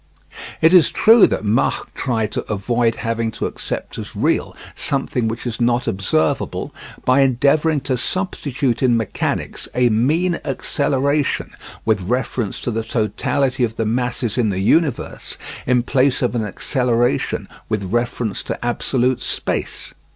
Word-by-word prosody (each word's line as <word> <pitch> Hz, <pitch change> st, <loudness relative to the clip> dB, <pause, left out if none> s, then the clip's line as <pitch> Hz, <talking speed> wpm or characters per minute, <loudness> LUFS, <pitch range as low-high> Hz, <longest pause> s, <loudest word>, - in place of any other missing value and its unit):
It 160 Hz, +2 st, +5 dB
is 180 Hz, -4 st, +7 dB
true 225 Hz, 0 st, +6 dB
that -, -, -2 dB
Mach 110 Hz, +5 st, 0 dB
tried 110 Hz, -5 st, -1 dB
to -, -, -2 dB
avoid 115 Hz, +3 st, +1 dB
having 115 Hz, 0 st, 0 dB
to -, -, -3 dB
accept -, -, -5 dB
as -, -, -8 dB
real -, -, 0 dB, 0.2 s
something 135 Hz, -4 st, -1 dB
which 115 Hz, +3 st, -4 dB
is 120 Hz, 0 st, -4 dB
not 120 Hz, +1 st, +2 dB
observable 90 Hz, -4 st, 0 dB, 0.3 s
by 130 Hz, +2 st, +4 dB
endeavouring 140 Hz, +4 st, +3 dB
to 130 Hz, -1 st, -1 dB
substitute 140 Hz, -, -1 dB
in 125 Hz, -3 st, +4 dB
mechanics 115 Hz, -3 st, -2 dB
a 125 Hz, -1 st, +4 dB
mean 155 Hz, +11 st, +1 dB
acceleration 140 Hz, 0 st, 0 dB, 0.3 s
with 110 Hz, -3 st, +2 dB
reference 120 Hz, +1 st, -2 dB
to 120 Hz, -, -2 dB
the 115 Hz, 0 st, -2 dB
totality 125 Hz, +4 st, 0 dB
of 115 Hz, -2 st, -1 dB
the 115 Hz, -, -1 dB
masses 120 Hz, 0 st, -1 dB
in 115 Hz, -3 st, +2 dB
the 95 Hz, -, -2 dB
universe 140 Hz, -, 0 dB, 0.3 s
in 125 Hz, -1 st, +3 dB
place 130 Hz, +1 st, +2 dB
of 125 Hz, -, +1 dB
an 115 Hz, -2 st, 0 dB
acceleration 120 Hz, +3 st, 0 dB, 0.2 s
with 110 Hz, -2 st, -1 dB
reference 120 Hz, -2 st, -1 dB
to -, -, -5 dB
absolute 125 Hz, +1 st, 0 dB
space. -, -, -3 dB
120 Hz, 145 wpm, -20 LUFS, 115-135 Hz, 0.3 s, is